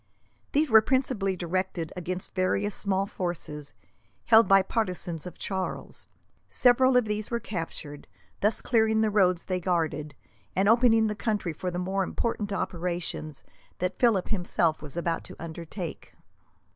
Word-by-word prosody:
These 295 -2 +2
were 220 0 +9
principally 230 -6 0
directed 180 -1 -2
against 180 +1 -3
various 195 +2 0
small 195 -1 0
fortresses, 165 -6 -5 0.5
held 225 0 +6
by 195 -1 +6
partisans 180 -6 -2
of 180 - -10
Charles. 190 -1 -4 0.4
Several 255 +1 +4
of 250 - +3
these 210 0 -3
were 235 - -1
captured, 165 -7 -6 0.3
thus 210 +2 +1
clearing 220 -2 +3
the 220 -1 +2
roads 185 -4 +3
they 185 -2 -1
guarded, 160 -4 -1 0.4
and 195 +2 +2
opening 225 0 +5
the 210 - 0
country 205 -5 -2
for 180 +4 -4
the 175 - -4
more 190 +2 0
important 210 +1 -2
operations 175 -5 -3 0.3
that 185 +1 -2
Philip 225 -7 +3
himself 175 -5 0
was 150 +1 -9
about 170 -1 -1
to - - -8
undertake. 170 +1 -7
190 Hz, 145 wpm, -27 LUFS, 175-220 Hz, 0.5 s, were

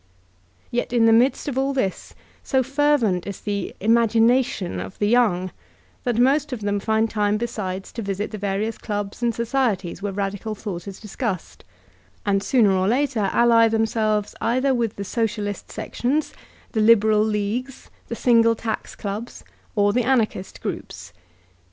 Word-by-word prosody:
Yet 240 - -1
in 235 -2 +4
the 225 - +6
midst 245 +6 +3
of 265 -2 -1
all 275 +1 0
this, 195 -8 -2 0.3
so 265 -2 +1
fervent 265 -9 +1
is 200 - -5
the 205 -1 -2
social - - -13
imagination 230 - +2
of 95 +1 -7
the 205 - +1
young 205 -6 +2 0.5
that 240 -2 0
most 275 +4 +3
of 245 -4 -4
them 205 0 0
find 220 +2 +1
time 210 -1 0
besides 195 -5 -4
to 230 - -5
visit 200 0 -3
the 215 - -6
various 205 +3 -2
clubs 205 0 -4
and 240 -1 +2
societies 225 -8 -1
where 205 0 -2
radical 200 +2 -3
thought 195 -4 -6
is 195 -1 -8
discussed, 210 -3 -5 0.6
and 200 -1 +2
sooner 215 0 +3
or 190 0 +1
later 240 -4 +1
ally 230 -1 +5
themselves 220 -2 0
either 255 +4 +2
with 235 -4 -1
the 200 - -5
Socialist 210 -1 -2
Sections, 285 +5 -2 0.4
the 220 - 0
Liberal 215 -1 +5
Leagues, 220 +5 -3 0.2
the 235 - -4
Single 230 -1 +4
Tax 220 -1 -4
Clubs, 210 +4 -6 0.3
or 205 -1 +3
the 250 - +2
Anarchist 230 -6 0
Groups. 85 - -6
220 Hz, 155 wpm, -23 LUFS, 200-240 Hz, 0.6 s, the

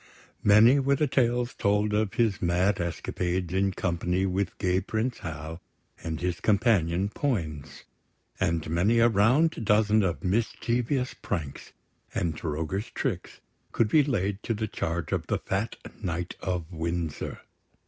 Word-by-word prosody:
Many 110 +7 +7
were 140 +1 +2
the 150 - +2
tales 125 -2 +1
told 105 +1 +1
of 105 0 0
his 115 -5 +1
mad 90 +2 +2
escapades 85 +1 -2
in 95 +1 +2
company 90 +1 -1
with 95 0 -1
gay 90 -1 +1
Prince 115 +5 -2
Hal 80 +1 -6 0.4
and 80 -1 -3
his 90 0 -2
companion 100 -5 +2
Poins; 85 - -3 0.6
and 85 -4 0
many 90 +9 +2
a 115 0 +6
round 120 +7 +3
dozen 105 +1 +4
of 90 -2 -1
mischievous 120 +5 0
pranks 80 -8 -5 0.4
and 85 -2 0
roguish 80 +6 -3
tricks - - -3 0.3
could 110 - +2
be 150 +4 +5
laid 100 -7 -1
to 115 - -2
the 110 +1 -2
charge 85 -4 -3
of - - -1
the - - +1
fat 100 +4 -2 0.3
Knight 90 -1 -3
of 90 -3 -3
Windsor. 85 -1 -3
95 Hz, 140 wpm, -27 LUFS, 85-115 Hz, 0.6 s, Many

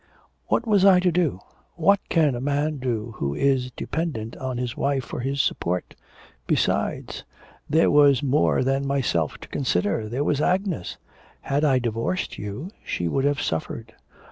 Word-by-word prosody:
'What 235 - +1
was 205 -4 +3
I 190 -2 +7
to 180 -1 +2
do; 165 - 0 0.3
what 190 +4 +4
can 155 -5 +3
a 120 - -4
man 145 +2 0
do 120 -3 -2
who 70 0 -2
is 135 - +1
dependent 125 -5 -4
on 130 -2 -4
his 125 0 -3
wife 140 -3 0
for - - -6
his 135 +3 0
support? 90 +1 -2 0.5
Besides, - - 0 0.5
there 160 +2 +4
was 145 -3 +5
more 140 0 +2
than 135 +1 0
myself 125 - 0
to - - -9
consider, 105 -3 -1
there 130 +5 -1
was 145 -1 +1
Agnes; 185 - -1 0.4
had 140 +2 -1
I 135 -4 +4
divorced 120 +9 -2
you 105 - -6
she 85 - -2
would 135 +10 0
have 145 -1 +1
suffered.' 80 -1 -4
135 Hz, 160 wpm, -24 LUFS, 120-155 Hz, 0.5 s, I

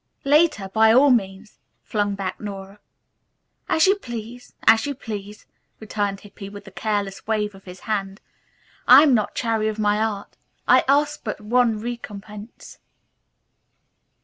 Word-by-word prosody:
"Later, 290 - +3
by 220 +3 +4
all 265 +4 +6
means," 200 -2 -2 0.2
flung 205 -2 -1
back 195 -2 -5
Nora. 200 -1 -8 0.9
"As 320 - +4
you 385 - +5
please. 240 - -9
As 225 +4 +5
you 285 - -3
please," 210 -3 -8 0.3
returned 205 -2 -3
Hippy 200 -1 -11
with 205 0 -11
a 195 - -12
careless 205 -2 -3
wave 210 -2 -1
of 195 0 -16
his 180 0 -11
hand. 195 -3 -3 0.7
"I 265 +4 +9
am 290 -4 +4
not 215 -4 0
chary 225 -2 0
of 215 0 -3
my 210 -1 +1
art. 210 -2 -4 0.3
I - - +5
ask 290 +2 +2
for - - -40
but - - -20
one 230 0 +1
recompense." 210 -2 -9
215 Hz, 150 wpm, -22 LUFS, 200-240 Hz, 0.9 s, I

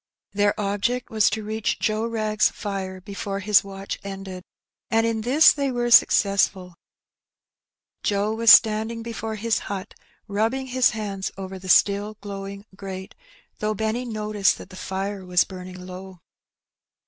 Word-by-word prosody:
Their 205 +1 +1
object 205 +5 -1
was 215 -1 +3
to 220 +1 -3
reach 215 +1 -2
Joe 215 +1 -1
Wrag's 215 -2 +1
fire 190 -2 -5
before 195 +1 -5
his 205 +1 +4
watch 195 0 -6
ended, 195 -2 -7 0.5
and 225 0 +2
in 225 -1 -1
this 270 +8 +6
they 280 -2 -1
were 240 -1 -1
successful. 195 -4 +4 1.3
Joe 205 +1 0
was 230 +1 +6
standing 220 +1 +5
before 225 -1 -5
his 225 +1 0
hut, 195 -1 -5 0.3
rubbing 225 +6 -1
his 255 -1 +3
hands 205 -4 -4
over 190 0 -7
the 185 0 -9
still 205 +3 +3
glowing 200 0 -7
grate, 190 -1 -8 0.5
though 215 0 -1
Benny 220 +3 -1
noticed 210 -3 0
that - - -12
the - - -10
fire 190 +1 -4
was 180 -1 +3
burning 185 -1 -9
low. 185 0 -10
205 Hz, 145 wpm, -24 LUFS, 195-220 Hz, 1.3 s, this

